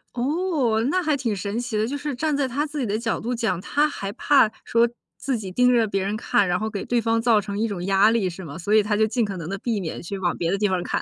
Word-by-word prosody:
哦， 275 -3 0
那 370 - +2
还 310 -4 +1
挺 235 -5 -1
神 200 +4 -3
奇 240 -2 -4
的， 215 +1 +1
就 285 - -3
是 290 0 -4
站 300 +4 0
在 275 - +1
他 280 +4 -1
自 295 0 -5
己 255 - 0
的 210 0 -1
角 230 -1 -1
度 240 +2 -3
讲， 230 -7 -1
他 295 +7 +1
还 200 -8 -5
怕 270 +1 +4 0.2
说 235 +1 +3 0.3
自 265 -4 -2
己 195 -3 -6
盯 250 +5 +4
着 230 -2 +3
别 195 -1 -1
人 200 +2 -2
看， 205 -2 +1
然 180 0 +1
后 220 - -2
给 205 -3 -5
对 240 -1 +1
方 225 0 +1
造 225 -2 +3
成 200 0 -5
一 225 - +1
种 190 -4 -4
压 195 +3 +4
力 210 -6 +1
是 180 +2 -9
吗？ 145 -3 -8
所 205 +5 +1
以 215 - +5
他 210 0 0
就 215 +1 +3
尽 235 +1 0
可 195 -2 -5
能 165 0 -6
地 195 - -3
避 220 +1 -2
免 165 -3 -5
去 195 +3 -5
往 175 -2 -1
别 170 -1 -1
的 195 - +1
地 210 - +2
方 185 - 0
儿 175 - -3
看。 - - -2
220 Hz, 325 characters per minute, -23 LUFS, 195-250 Hz, 0.3 s, 以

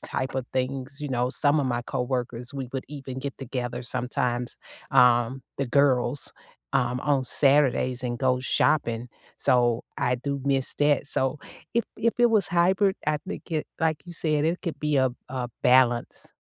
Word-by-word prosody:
type 130 - -4
of 130 -2 -2
things, 130 +2 -3
you 150 - -4
know? 125 -1 0
Some 145 +2 +2
of - - -1
my 120 -1 -1
coworkers, 125 -1 -3
we 135 -2 -4
would 135 -1 -3
even 135 -3 -7
get 140 +1 -5
together 125 -2 -4
sometimes, 125 0 -1 0.3
um- 125 +1 +4 0.2
the 140 - 0
girls- 140 +1 +1 0.4
um, 125 0 +1
on 140 -2 +1
Saturdays 130 -2 +2
and 120 -1 -2
go 130 -1 +2
shopping. 125 -3 +1 0.3
So 120 -2 +2 0.2
I 125 - +1
do 140 +2 -3
miss 135 -2 +1
that. 145 -1 +2
So 135 0 +2 0.4
if 235 - +2
if 230 +1 +1
it 240 - +7
was 215 -4 +3
hybrid, 190 +3 +3
I 150 0 +2
think 200 - -7
it 155 -1 -1
like 160 -1 +1
you 175 - -8
said, 155 -3 +1
it 170 +3 0
could 165 -5 -4
be 150 -1 +1
a 130 -1 +4 0.2
a 125 -2 -3
balance, 125 -1 +2
130 Hz, 170 wpm, -26 LUFS, 125-145 Hz, 0.4 s, it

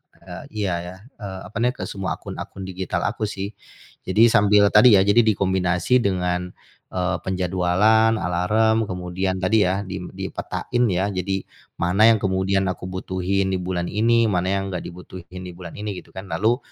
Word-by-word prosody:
eee, - - -10 0.2
iya 95 -3 0
ya, 90 - -8 0.3
eee, 95 -2 -6
apa - - -6
nih, 120 +2 +2
ke - - -6
semua 95 -1 -3
akun-akun 95 - -8
digital 95 0 -3
aku 110 - -1
sih. 100 0 -5 0.6
Jadi 110 +5 +5
sambil 105 -1 +5
tadi 110 +1 +7
ya 95 - +5
jadi 100 +4 +5
dikombinasi 95 +1 +2
dengan, 90 -4 -1 0.3
eee, 90 -1 -1
penjadwalan, 95 +5 +2
alarm, 110 +5 +1
kemudian 90 +1 -2
tadi 105 +1 +3
ya, 95 +2 -1
dim 95 -2 -6
dipetain 120 0 -3
ya, 95 +1 0
jadi 95 +1 -2 0.3
mana 95 +6 +3
yang 115 - +5
kemudian 95 0 +1
aku 90 0 -7
butuhin 95 +1 -1
di 95 - -1
bulan 90 -1 -2
ini, 115 +2 +3
mana 90 -1 0
yang 95 0 -3
nggak 90 -2 -4
dibutuhin 90 +1 -10
di 90 - -7
bulan 85 -1 -10
ini 105 -2 -4
gitu - - -18
kan. 95 +1 -8
Lalu 115 +4 +2
95 Hz, 170 wpm, -22 LUFS, 90-105 Hz, 0.6 s, tadi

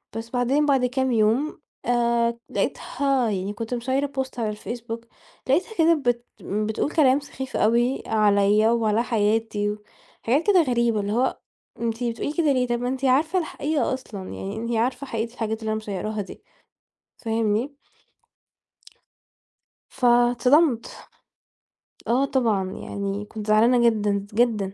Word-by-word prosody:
بس. 225 0 -5
بعدين 255 +5 +1
بعد 270 -3 +3
كام 260 +1 0
يوم، 230 +8 +1 0.3
آآ 235 -1 +1
لقيتها 270 -4 0
يعني 195 +1 -3
كنت 225 +3 -5
مشيّرة 260 +3 0
بوست 265 -3 -5
على 220 -2 0
الفيسبوك، 230 +2 -6 0.4
لقيتها 365 - +1
كده 330 0 +5
بت 245 -5 -1 0.2
بتقول 215 +7 -2
كلام 275 -4 +4
سخيف 265 -2 -6
أوي 240 +5 +2
عليّا 210 0 +3
وعلى 225 -1 +1
حياتي 210 -2 0 0.5
وحاجات 275 - +1
كده 385 -4 +6
غريبة، 235 -5 +1
اللي 200 0 -2
هو 255 +3 +1 0.4
أنتِ 230 +1 -2
بتقولي 240 +5 -2
كده 310 -3 +2
ليه؟ 250 -1 +1
طب 240 0 -1
ما 245 - -1
أنتِ 265 +1 -2
عارفة 310 +8 +3
الحقيقة 305 -3 -1
أصلًا، 235 -6 -7
يعني 195 +2 -6
أنتِ 230 +1 -3
عارفة 255 +5 -1
حقيقة 230 -1 -3
الحاجات 220 -2 -3
اللي 220 - -3
أنا 215 - 0
مشيّراها 215 0 -4
دي، 195 - -11 0.8
فاهمني؟ 225 +4 -1 2.1
فاتصدمت. 245 +2 +2 1.0
آه 255 +4 +3
طبعًا. 230 -8 +1
يعني 200 +1 -4
كنت 215 0 -8
زعلانة 235 +3 +5
جدًا، 205 -2 -1
جدًا. 215 -4 +1
235 Hz, 135 wpm, -24 LUFS, 215-260 Hz, 2.1 s, كده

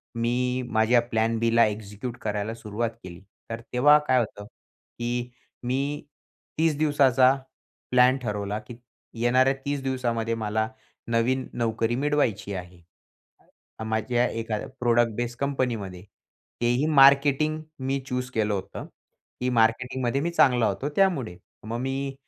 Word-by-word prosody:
मी 125 +2 0
माझ्या 110 +2 +4
प्लॅन 115 -1 0
बीला 115 0 +4
एक्झिक्यूट 105 +3 -6
करायला 105 +1 -2
सुरुवात 115 +1 -3
केली. 85 -1 -10 0.3
तर 115 0 -5
तेव्हा 145 +4 +6
काय 130 -1 +4
होतं, 105 -3 -4
की 120 +2 -7 0.3
मी 135 +4 -2 0.5
30 160 -2 +2
दिवसाचा 135 -4 +4 0.6
प्लॅन 125 +1 +5
ठरवला, 105 -2 -3
की 110 +2 -11 0.5
येणाऱ्या 130 +3 +4
30 140 -1 -1
दिवसामध्ये 120 -4 -1
मला 110 0 -1 0.4
नवीन 120 +3 +1
नोकरी 115 0 0
मिळवायची 130 -8 0
आहे 90 -1 -8 1.0
अ, - - -4
माझ्या 115 +3 0
एका 115 -1 -3 0.2
प्रोडक्ट 120 -1 +3
बेस 120 +1 -3
कंपनीमध्ये. 120 -10 -2 0.6
तेही 120 +4 +2 0.2
मार्केटिंग 140 +3 +5 0.2
मी 135 +1 -1
चूज 125 0 -3
केलं 110 -3 0
होतं, 100 0 -5 0.6
की 125 - +1
मार्केटिंगमध्ये 125 +3 +1
मी 170 - 0
चांगला 125 -8 +4
होतो 105 +8 -2
त्यामुळे. 145 - +1 0.3
मग 115 +2 -4
मी 135 +1 -3
120 Hz, 125 wpm, -26 LUFS, 110-130 Hz, 1.0 s, तेव्हा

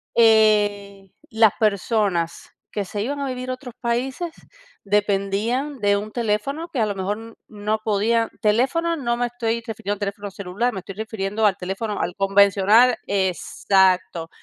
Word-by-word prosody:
eh, 205 -3 +3 0.2
las 220 -2 +4
personas 200 -5 0 0.2
que 205 -2 -3
se 205 +2 -4
iban 285 +4 -3
a 275 - -2
vivir 255 0 -5
a - - -1
otros 255 -2 -11
países 260 +8 -2 0.5
dependían 210 +7 0
de 205 -1 +2
un 210 +1 -5
teléfono 240 +9 -2
que 270 - -3
a - - +3
lo 205 - -2
mejor 195 +2 -2
n 225 0 -11
no 215 0 -2
podían 225 +2 +1
teléfono, 270 +11 +1
no 235 -4 -1
me 245 - 0
estoy 235 -1 -2
refiriendo 205 -3 -3
a - - -23
teléfono 200 0 -4
celular, 200 +6 -2
me 195 - -4
estoy 195 - -9
refiriendo 215 0 -2
al 195 -2 0
teléfono, 195 +3 -4
al 180 - -3
convencional 200 +4 +4
exacto. 190 -2 +1
210 Hz, 160 wpm, -22 LUFS, 200-235 Hz, 0.5 s, las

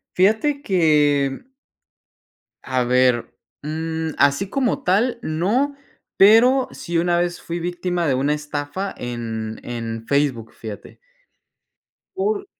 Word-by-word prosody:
Fíjate 220 +10 +2
que, 150 - +3
mm 260 - -30 1.1
a 130 -1 0
ver, 125 -1 +2 0.3
mm, 160 +1 -3
así 140 +7 +3
como 255 +2 -1
tal 225 +7 +2
no, 215 - 0 0.4
pero 240 +6 +6
sí 170 - -5
una 175 0 +2
vez 175 0 -1
fui 170 +1 -4
víctima 175 0 -2
de 135 - +2
una 140 +3 +1
estafa 150 +6 -4
en, 115 -2 -5
en 115 -1 -5
Facebook, 140 -6 0
fíjate. 110 -3 -9 1.2
Por 405 +1 -1
160 Hz, 115 wpm, -21 LUFS, 130-195 Hz, 1.2 s, pero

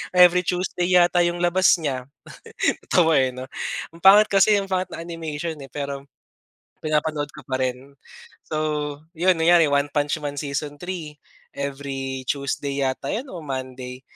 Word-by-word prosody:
every 180 0 +6
Tuesday 180 -1 -1
yata 175 0 +5
'yong 175 0 -1
labas 185 +2 +4
niya. 130 -4 -2 0.6
Natawa 165 -4 +3
eh, 130 -1 +1
'no. 130 - -6 0.5
Ang 165 - -14
pangit 205 +3 +7
kasi, 200 +2 +5
ang 195 -1 -2
pangit 185 0 0
ng 165 - -6
animation 165 -1 -5
eh, 135 - -9
pero, 140 -1 -5 0.8
pinapanood 155 -1 -1
ko 150 - -10
pa 130 0 -2
rin. 130 +2 -3 0.5
So, 155 - -3 0.6
'yon 175 +1 +2
kunyari 165 -2 +5
One 145 0 +1
Punch 145 +1 0
Man 145 -1 -3
season 145 0 -4
3 170 -5 -6 0.4
every 135 -2 -4
Tuesday 140 +1 -2
yata 130 +1 -2
'yon, 250 +6 -4
o 175 - -7
Monday. 130 -1 -6
150 Hz, 155 wpm, -23 LUFS, 140-175 Hz, 0.8 s, pangit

